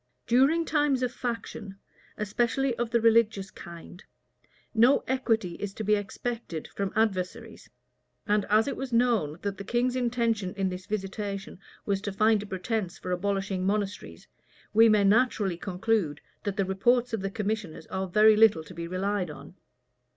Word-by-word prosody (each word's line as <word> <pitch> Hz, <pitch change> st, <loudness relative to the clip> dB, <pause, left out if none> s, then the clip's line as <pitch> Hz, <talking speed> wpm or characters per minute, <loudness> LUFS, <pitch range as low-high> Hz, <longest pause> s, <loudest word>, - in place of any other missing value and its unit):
During 275 Hz, +8 st, +3 dB
times 290 Hz, -5 st, +1 dB
of 250 Hz, -, 0 dB
faction, 230 Hz, -5 st, -5 dB, 0.4 s
especially 240 Hz, +5 st, 0 dB
of 240 Hz, -1 st, -1 dB
the 235 Hz, 0 st, +2 dB
religious 220 Hz, -4 st, +3 dB
kind, 170 Hz, +2 st, -11 dB, 0.7 s
no 240 Hz, +4 st, +4 dB
equity 225 Hz, -8 st, 0 dB
is 200 Hz, -1 st, -5 dB
to 220 Hz, -, -4 dB
be 210 Hz, +1 st, +2 dB
expected 210 Hz, -4 st, -3 dB
from 200 Hz, -1 st, -3 dB
adversaries; 220 Hz, +1 st, -2 dB, 0.6 s
and 210 Hz, 0 st, +2 dB
as 215 Hz, +3 st, +3 dB
it -, -, -2 dB
was 270 Hz, -1 st, -5 dB
known, 230 Hz, -11 st, +2 dB
that 200 Hz, -1 st, -3 dB
the -, -, -5 dB
king's 245 Hz, +4 st, 0 dB
intention 230 Hz, -6 st, 0 dB
in 195 Hz, -1 st, 0 dB
this 185 Hz, +1 st, -7 dB
visitation 195 Hz, -2 st, -4 dB, 0.3 s
was 195 Hz, -1 st, 0 dB
to 205 Hz, -, -3 dB
find 215 Hz, +1 st, +3 dB
a 210 Hz, -, -8 dB
pretence 190 Hz, -1 st, -3 dB
for 180 Hz, -, -6 dB
abolishing 195 Hz, 0 st, -1 dB
monasteries, 195 Hz, -, -3 dB, 0.5 s
we 225 Hz, +1 st, +7 dB
may 210 Hz, -1 st, +4 dB
naturally 205 Hz, -3 st, +2 dB
conclude, 185 Hz, -3 st, -1 dB, 0.3 s
that 205 Hz, 0 st, -2 dB
the 195 Hz, -, +1 dB
reports 240 Hz, +6 st, +1 dB
of 220 Hz, -, -1 dB
the 195 Hz, -, -2 dB
commissioners 210 Hz, -6 st, -4 dB
are 190 Hz, 0 st, -2 dB
very 215 Hz, +4 st, +6 dB
little 210 Hz, -7 st, +5 dB
to 170 Hz, -, -12 dB
be 170 Hz, 0 st, -5 dB
relied 185 Hz, 0 st, -1 dB
on. 150 Hz, -, -10 dB
210 Hz, 160 wpm, -27 LUFS, 190-230 Hz, 0.7 s, we